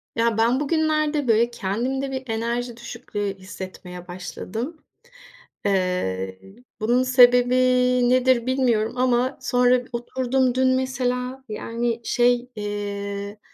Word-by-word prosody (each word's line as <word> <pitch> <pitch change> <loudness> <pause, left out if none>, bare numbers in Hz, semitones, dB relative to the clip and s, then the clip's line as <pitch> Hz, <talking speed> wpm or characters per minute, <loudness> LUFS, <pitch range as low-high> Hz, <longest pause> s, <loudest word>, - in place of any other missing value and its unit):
Ya, 230 -1 +1
ben 235 +4 +3
bugünlerde, 305 -1 +1
böyle, 230 +1 +3
kendimde 245 +6 -2
bir 265 0 -4
enerji 235 +1 -2
düşüklüğü 205 -4 -5
hissetmeye 185 -2 -9
başladım. 220 - -6 0.9
Eee, 180 - -1 0.4
bunun 240 +4 +2
sebebi 250 -1 +5 0.5
nedir 255 -1 +3
bilmiyorum 245 -4 +1
ama 255 +1 +1
sonra 250 0 +3
oturdum 250 +1 0
dün 260 0 +3
mesela, 255 0 -2
yani, 230 +2 -3
şey, 245 +1 +2
eee, 205 0 -5
240 Hz, 100 wpm, -23 LUFS, 210-255 Hz, 0.9 s, sebebi